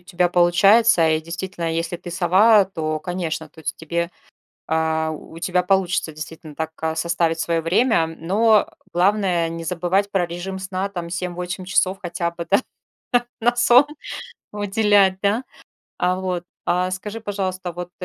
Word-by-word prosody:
тебя 180 Hz, -1 st, +1 dB
получается 180 Hz, +2 st, +5 dB
и 155 Hz, 0 st, +1 dB
действительно, 170 Hz, 0 st, -4 dB
если 165 Hz, +1 st, -2 dB
ты 175 Hz, 0 st, -9 dB
сова, 190 Hz, +4 st, +5 dB
то, 155 Hz, -4 st, -3 dB
конечно, 160 Hz, -2 st, -4 dB
то 160 Hz, -, -16 dB
есть 160 Hz, -, -4 dB
тебе, 170 Hz, +2 st, -2 dB, 0.6 s
а, 160 Hz, 0 st, 0 dB
у 155 Hz, +1 st, -9 dB
тебя 180 Hz, 0 st, +1 dB
получится 180 Hz, -4 st, +1 dB
действительно 155 Hz, 0 st, -9 dB
так, 160 Hz, +1 st, -3 dB
а, 160 Hz, 0 st, -1 dB
составить 165 Hz, 0 st, 0 dB
свое 165 Hz, -1 st, 0 dB
время. 170 Hz, +2 st, +2 dB
Но 200 Hz, +7 st, +2 dB, 0.2 s
главное 180 Hz, -2 st, +2 dB
не 165 Hz, 0 st, -6 dB
забывать 180 Hz, +3 st, 0 dB
про 190 Hz, -2 st, +2 dB
режим 175 Hz, +3 st, -5 dB
сна, 190 Hz, +1 st, -3 dB
там, 175 Hz, -4 st, -6 dB
7-8 180 Hz, +1 st, -4 dB
часов 185 Hz, 0 st, +1 dB
хотя 170 Hz, -1 st, -2 dB
бы, 170 Hz, 0 st, -7 dB
да, 200 Hz, -, +4 dB, 0.8 s
на 240 Hz, +2 st, +2 dB
сон 245 Hz, +3 st, +6 dB, 0.7 s
уделять, 205 Hz, -2 st, +3 dB
да, 205 Hz, +6 st, +1 dB, 0.5 s
а. 180 Hz, +1 st, +1 dB
Вот. 180 Hz, -2 st, -3 dB, 0.2 s
А 180 Hz, +1 st, +1 dB
скажи, 210 Hz, +4 st, -5 dB
пожалуйста, 190 Hz, -4 st, -3 dB
вот 175 Hz, +1 st, -7 dB
180 Hz, 150 wpm, -22 LUFS, 165-195 Hz, 0.8 s, сон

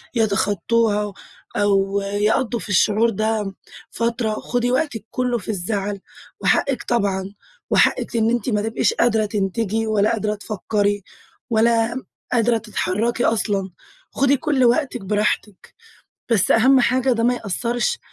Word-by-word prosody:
يتَخطوها 210 Hz, 0 st, +1 dB, 0.4 s
أو 200 Hz, -1 st, +2 dB
يقضوا 210 Hz, +4 st, 0 dB
في 200 Hz, -, -9 dB
الشعور 215 Hz, +3 st, +3 dB
ده 215 Hz, -2 st, -1 dB, 0.4 s
فترة. 230 Hz, -1 st, -1 dB
خُدي 245 Hz, +2 st, -1 dB
وَقتك 255 Hz, -6 st, -1 dB
كُله 250 Hz, -1 st, 0 dB
في 220 Hz, -, -9 dB
الزعل. 200 Hz, 0 st, -2 dB, 0.4 s
وحقك 275 Hz, -2 st, +1 dB
طبعًا، 200 Hz, -4 st, -1 dB, 0.4 s
وحقِك 235 Hz, -, +2 dB
إن 225 Hz, 0 st, +2 dB
أنت 240 Hz, +1 st, -1 dB
ما 210 Hz, -2 st, +1 dB
تبقِيش 225 Hz, +1 st, 0 dB
قادرة 220 Hz, -2 st, +2 dB
تنتجِي، 210 Hz, +2 st, -1 dB
ولا 215 Hz, +1 st, +2 dB
قادرة 210 Hz, -1 st, -1 dB
تفكّري، 205 Hz, -1 st, -1 dB, 0.5 s
ولا 230 Hz, +2 st, +2 dB, 0.3 s
قادرة 235 Hz, -1 st, +2 dB
تتحركي 225 Hz, +2 st, -1 dB
أصلًا. 200 Hz, -3 st, 0 dB, 0.4 s
خُدي 275 Hz, 0 st, +2 dB
كل 270 Hz, -1 st, +1 dB
وقتك 245 Hz, -1 st, +1 dB
براحتِك. 210 Hz, -1 st, -2 dB, 0.6 s
بس 215 Hz, -, +3 dB
أهم 255 Hz, +4 st, +5 dB
حاجة 255 Hz, +2 st, +2 dB
ده 230 Hz, -1 st, 0 dB
ما 245 Hz, +1 st, +3 dB
يأثرش 240 Hz, -, -2 dB
220 Hz, 125 wpm, -21 LUFS, 205-235 Hz, 0.6 s, أهم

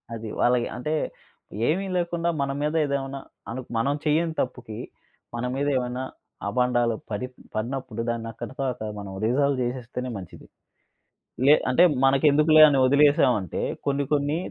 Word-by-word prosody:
అది. 110 Hz, -1 st, -6 dB
వాళ్ళకి 120 Hz, -1 st, +3 dB
అంటే, 150 Hz, +5 st, -2 dB, 0.7 s
ఏమి 185 Hz, +6 st, +1 dB
లేకుండా 170 Hz, -1 st, -1 dB
మన 135 Hz, 0 st, 0 dB
మీద 150 Hz, +1 st, 0 dB
ఏదేమైనా 140 Hz, -1 st, -3 dB, 0.3 s
అను 130 Hz, +3 st, -4 dB, 0.2 s
మనం 135 Hz, +5 st, +1 dB
చెయ్యని 160 Hz, +2 st, +2 dB
తప్పుకి 120 Hz, -4 st, -5 dB, 0.6 s
మన 120 Hz, +1 st, -2 dB
మీద 140 Hz, +1 st, -1 dB
ఏమైనా 125 Hz, 0 st, -3 dB, 0.4 s
అబాండాలు 120 Hz, +1 st, +1 dB, 0.2 s
పడి 105 Hz, +5 st, -2 dB, 0.3 s
పడినప్పుడు 120 Hz, +1 st, -3 dB
దాన్ని 115 Hz, -1 st, -3 dB
అక్కడితో 135 Hz, +5 st, -6 dB
అక్కడ 110 Hz, -3 st, -6 dB
మనం 100 Hz, -1 st, -7 dB
రిజాల్వ్ 140 Hz, +4 st, +2 dB
జేసేస్తేనే 125 Hz, 0 st, -4 dB
మంచిది. 90 Hz, -3 st, -11 dB, 1.0 s
లే 145 Hz, -, +9 dB, 0.2 s
అంటే 130 Hz, +7 st, +5 dB, 0.2 s
మనకెందుకులే 150 Hz, +3 st, +5 dB
అని 140 Hz, -2 st, +2 dB
వదిలేశామంటే, 135 Hz, -, +3 dB, 0.3 s
కొన్ని 140 Hz, 0 st, +1 dB
కొన్ని 145 Hz, +1 st, +1 dB
130 Hz, 130 wpm, -25 LUFS, 120-145 Hz, 1.0 s, లే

